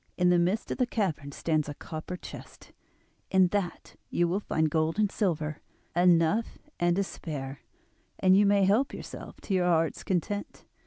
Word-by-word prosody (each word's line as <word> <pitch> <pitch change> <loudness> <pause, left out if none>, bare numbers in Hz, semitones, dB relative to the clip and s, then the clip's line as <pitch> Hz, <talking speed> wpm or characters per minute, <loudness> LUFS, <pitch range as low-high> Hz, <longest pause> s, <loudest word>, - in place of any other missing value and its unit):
In 180 0 +4
the 175 - +4
midst 185 +6 0
of - - -3
the 250 - +2
cavern 165 -12 -2
stands 155 0 -1
a 145 - -5
copper 160 +4 -6
chest, - - -11 0.6
in 190 -1 +4
that 195 -3 -3
you 175 - +2
will 180 +4 0
find 160 -6 0
gold 160 +2 0
and 210 -2 +2
silver, 155 -7 -1 0.3
enough 175 +5 +3 0.2
and 175 0 +3
to 200 - +2
spare, 140 -7 -6 0.6
and 185 0 +5
you 205 +1 +5
may 200 0 +4
help 220 +8 +2
yourself - - -9
to 200 - -3
your 180 -1 +2
heart's 165 -2 +1
content. 200 +3 -3
175 Hz, 170 wpm, -28 LUFS, 160-200 Hz, 0.6 s, and